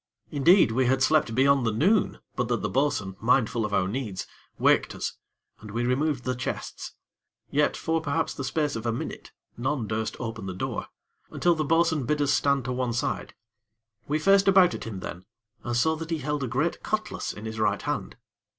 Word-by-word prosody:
Indeed, 155 - +5
we 130 +2 +2
had 130 +1 +2
slept 150 -7 +3
beyond 135 +1 +4
the 115 - +1
noon, 185 - +2 0.2
but 125 -1 -1
that 120 -1 -1
the - - 0
bo'sun, 125 -9 0
mindful 120 -1 +2
of - - -11
our 95 -2 +2
needs, 105 -4 -4 0.3
waked - - +3
us, - - -3 0.5
and 105 - -11
we 120 +4 -1
removed 135 +1 0
the 130 - -1
chests. 125 - -5 0.6
Yet, 145 +1 +2
for 160 0 0
perhaps 160 +1 -1
the 140 - -5
space 145 +2 -1
of 115 +1 -4
a - - +2
minute, 115 - -6 0.3
none 130 0 -1
durst 110 +1 -2
open 115 -4 -5
the 95 - -5
door, - - -3 0.4
until 175 - +2
the 155 -2 -1
bo'sun 165 -2 +2
bid 150 0 +1
us 145 -1 +2
stand 140 -1 +2
to 125 - -2
one 125 -1 -1
side. 120 - -2 0.7
We 150 - +1
faced 195 +4 +4
about 190 -2 +6
at - - -6
him 105 -5 -6
then, 90 +1 -7 0.4
and 120 -1 -1
saw 160 +6 +3
that 165 0 -6
he 165 - 0
held 150 0 -2
a - - -1
great 145 +8 -1
cutlass 215 0 -2
in 105 - -9
his 110 0 -5
right 105 -1 +1
hand. 145 -4 -3
135 Hz, 200 wpm, -26 LUFS, 115-155 Hz, 0.7 s, about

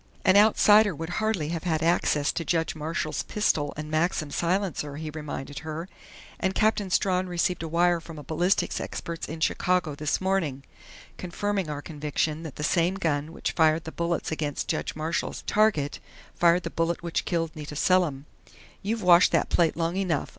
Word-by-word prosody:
"An 190 - +5
outsider 210 -1 +6
would 165 +2 -5
hardly 205 -9 0
have 165 -1 -3
had 160 -3 0
access 150 -3 +2
to 170 - -3
Judge 165 0 0
Marshall's 155 0 -3
pistol 155 -9 0
and 155 0 -6
Maxim 155 -2 0
silencer," 170 -5 -1
he 155 +1 -5
reminded 145 -2 -6
her. 160 +2 -6 0.5
"And 190 0 -1
Captain 215 -2 +2
Strawn 185 0 +1
received 180 0 0
a 165 - -4
wire 170 +1 +2
from 165 -1 -10
a 150 - -8
ballistics 170 +7 0
expert 170 -1 -5
in 160 +1 -6
Chicago 180 -2 +1
this 150 +1 -1
morning, 175 -8 -1 0.5
confirming 195 0 -2
our 145 -1 -5
conviction 150 0 -2
that 160 -4 -8
the 150 - -5
same 170 +4 +2
gun 155 -5 -1
which - - -3
fired 160 0 +3
the 160 - -7
bullets 170 0 -2
against 150 -2 -2
Judge - - -2
Marshall's 155 +2 -3
target 205 -10 +2 0.3
fired 170 +1 +3
the - - -4
bullet 170 +1 -1
which 170 -1 -1
killed 165 -2 -2
Nita 150 -1 -7
Selim.... 155 -4 +2 0.6
You've 220 +2 -2
washed 175 0 +6
that - - +2
plate 165 -2 +2
long 170 +2 -1
enough. 180 -7 -1
165 Hz, 175 wpm, -26 LUFS, 155-180 Hz, 0.6 s, outsider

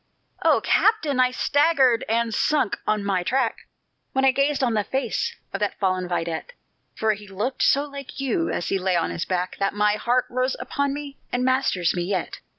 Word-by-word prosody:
"O - - +4
captain! 315 - +2
I 255 0 +5
staggered, 270 -2 +3
and 230 0 +1
sunk 295 -2 +1
on 215 -1 +1
my 190 -2 +1
track, 250 +5 -1 0.5
When 265 0 +2
I 265 - +6
gazed 275 +1 +1
on 240 -3 +2
the 210 -1 +1
face 265 0 -2 0.2
of 195 - -2
that 205 -1 -1
fallen 185 -2 0
vidette, 170 - -3 0.4
For 220 0 +1
he 205 0 -10
looked 210 +7 -3
so 280 +1 +4
like 280 -2 -9
you, 275 +5 0
as - - -2
he 195 - +1
lay 185 -1 +1
on 170 - 0
his 170 - -3
back, 180 0 -2
That 195 0 0
my 210 0 +2
heart 245 +3 +1
rose 255 +1 -1
upon 280 0 -1
me, 285 -1 -7
and 250 +1 0
masters 255 -10 +2
me 175 - -2
yet. 185 0 -2
235 Hz, 195 wpm, -24 LUFS, 195-270 Hz, 0.5 s, I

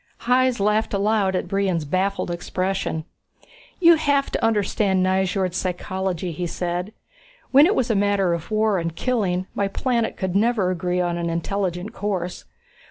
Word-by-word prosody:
Hys 250 0 +2
laughed 210 +1 +1
aloud 200 -1 +1
at 180 - -2
Brion's 185 -4 0
baffled 185 +3 -1
expression. 180 -2 -2 0.7
"You 335 -2 +7
have 285 -2 +1
to - - -2
understand 205 -3 +1
Nyjord 190 -1 0
psychology," 185 -1 -3
he 175 +2 -3
said. 175 +3 -3 0.6
"When 280 +4 +7
it 410 - +1
was 245 -2 +1
a - - +1
matter 200 -3 +2
of 170 -1 -5
war 215 -2 +2
and 165 -1 -3
killing, 190 -6 0
my 200 - 0
planet 235 +3 -1
could 190 -1 -2
never 210 -3 +2
agree 180 0 -1
on 175 -1 -1
an 170 0 -2
intelligent 180 +3 -2
course. 185 -4 -3
190 Hz, 155 wpm, -23 LUFS, 180-215 Hz, 0.7 s, You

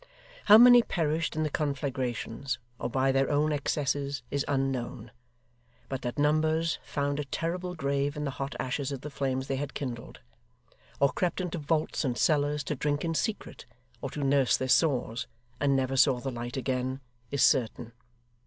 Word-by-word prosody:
How 210 +1 +9
many 245 +1 +9
perished 160 -6 -1
in 155 - 0
the 155 - 0
conflagrations, 135 -3 -2 0.2
or - - -2
by 135 +2 +2
their 135 0 +2
own 150 +1 +2
excesses, 140 -1 -1
is 140 0 0
unknown; 135 -4 -2 0.8
but 135 0 -3
that 120 -1 -4
numbers 155 +2 +2
found 140 0 -2
a 145 - -2
terrible 175 +6 -3
grave 140 -1 -1
in 150 - -3
the 140 - -2
hot 135 +1 -5
ashes 135 +2 -2
of 135 -2 -5
the 150 - -7
flames 130 -1 -2
they 135 0 -2
had 140 0 -5
kindled, 125 -5 -6 0.8
or 140 -1 +4
crept 180 +5 -1
into 180 -2 -3
vaults 155 +2 0
and 125 -4 -1
cellars 150 -1 +2
to 150 - -3
drink 145 +3 -1
in 165 - -1
secret 210 - -3 0.3
or - - -3
to 145 - -4
nurse 135 -2 +3
their 130 - -2
sores, 130 -3 +1 0.3
and 140 -1 +2
never 135 0 0
saw 130 -1 +4
the 135 +2 -4
light 120 +1 -5
again, 130 0 -2 0.3
is 140 - +1
certain. 120 -2 +2
140 Hz, 170 wpm, -29 LUFS, 130-150 Hz, 0.8 s, How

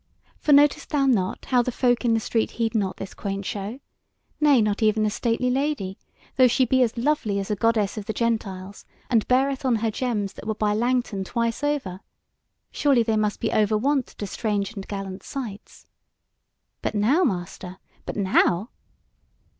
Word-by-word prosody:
for 300 - 0
notest 290 0 +5
thou 285 -3 +1
not 205 -9 0
how 250 -2 +3
the 250 - -2
folk 245 0 +1
in 230 -2 +3
the - - +2
street 225 0 0
heed 230 -1 0
not 200 -4 -1
this 195 - -7
quaint 195 -1 -4
show; 205 +7 -4 0.6
nay 295 -4 +5
not 210 -1 0
even 215 0 +3
the 215 - +1
stately 240 +3 0
lady, 265 -8 -1 0.4
though 255 -1 +7
she 255 +2 +3
be 260 +2 +2
as 235 -1 +1
lovely 235 -6 0
as 195 +1 -3
a - - +1
goddess 215 -1 +1
of 205 - -8
the - - 0
gentiles, 200 -4 -3 0.3
and 225 -3 +3
beareth 270 +2 +2
on 255 -3 +2
her 225 0 0
gems 215 -4 -2
that - - -10
would 220 -1 -2
buy 210 -1 +1
Langton 240 -3 0
twice 230 +5 -2
over; 275 -11 -1 0.7
surely 275 -5 +3
they 225 -1 0
must 210 -1 0
be - - -1
over 215 0 +2
wont 270 +3 +1
to 205 - -7
strange 205 0 -2
and 195 -3 -7
gallant 195 -1 -5
sights. 230 -7 -8 1.0
But - - -2
now, 250 - +3
master, 185 - -3 0.3
but - - -4
now!" 190 +1 +2
225 Hz, 180 wpm, -24 LUFS, 200-255 Hz, 1.0 s, though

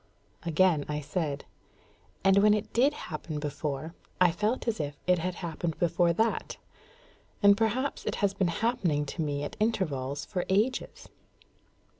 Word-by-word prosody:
Again 170 -2 +3
I 150 0 -1
said, 150 -1 -3 0.8
"And 195 +1 +5
when 210 +1 +6
it 210 - -4
did 265 +5 +4
happen 155 - -5
before, 150 +1 -4 0.3
I 180 -1 +6
felt 210 +8 -1
as 225 -2 0
if 145 -1 -3
it 180 -1 +3
had 180 +2 -2
happened 165 0 -3
before 175 0 +2
that; 220 +7 0 0.9
and 200 0 +8
perhaps 230 +6 0
it - - 0
has 200 -1 +1
been 190 -2 +1 0.2
happening 170 -11 +1
to 155 +4 -4
me 145 -2 -1
at 145 - -5
intervals 145 - -1
for 180 -4 -2
ages." 215 +7 0
175 Hz, 150 wpm, -29 LUFS, 150-210 Hz, 0.9 s, and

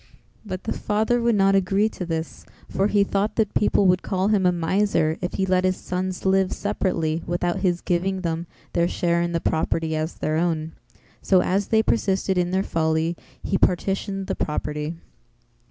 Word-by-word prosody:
But 185 -4 -6
the - - -2
father 220 +3 0
would 235 -1 +2
not 195 -1 +4
agree 195 +2 +2
to 180 -5 -6
this 160 -1 -4 0.2
for 195 - +1
he 205 -1 +3
thought 200 +1 -1
that 215 -3 0
people 205 -1 +2
would 180 0 +4
call 190 +1 0
him 200 -4 +3
a - - +4
miser 170 -2 +1
if 180 - -3
he 190 - +1
let 185 -1 +2
his 185 0 +1
sons 185 +1 -4
live 190 0 +3
separately 170 -6 -1
without 175 0 -1
his 175 -2 0
giving 185 +2 -1
them 170 -1 -2 0.3
their 170 0 +2
share 170 -1 0
in 170 0 -1
the 170 - 0
property 160 0 0
as 155 +1 -2
their 155 0 -1
own, 160 -2 -1 0.5
So 185 -2 +3
as 195 +2 0
they 220 0 +3
persisted 195 -4 +1
in 175 0 +1
their 190 +1 +1
folly 160 0 0 0.3
he 195 - 0
partitioned 195 +2 0
the - - -2
property. 150 +1 -3
185 Hz, 185 wpm, -23 LUFS, 170-195 Hz, 0.5 s, not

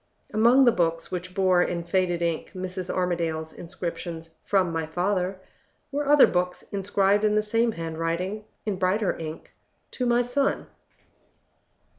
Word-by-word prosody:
Among 240 +5 +5
the 240 - +7
books 165 -4 -1
which 180 0 -5
bore 185 -2 +4
in 170 -1 -1
faded 175 -1 0
ink 170 -2 -2
Mrs. 185 0 -4
Armadale's 165 -3 -1
inscriptions, 170 -2 -6
"From 190 -4 +2
my 165 -1 -2
father," 185 +2 -1 0.5
were 290 0 -2
other 295 -1 +8
books 180 0 -1
inscribed 200 +1 +2
in 210 0 +3
the 215 - +3
same 225 +2 +1
handwriting, 165 +5 -3 0.2
in 205 -3 -1
brighter 190 +2 +1
ink, 160 -1 -7 0.4
"To 250 - -2
my 240 0 +3
son." 270 +3 0
185 Hz, 140 wpm, -26 LUFS, 170-210 Hz, 0.5 s, other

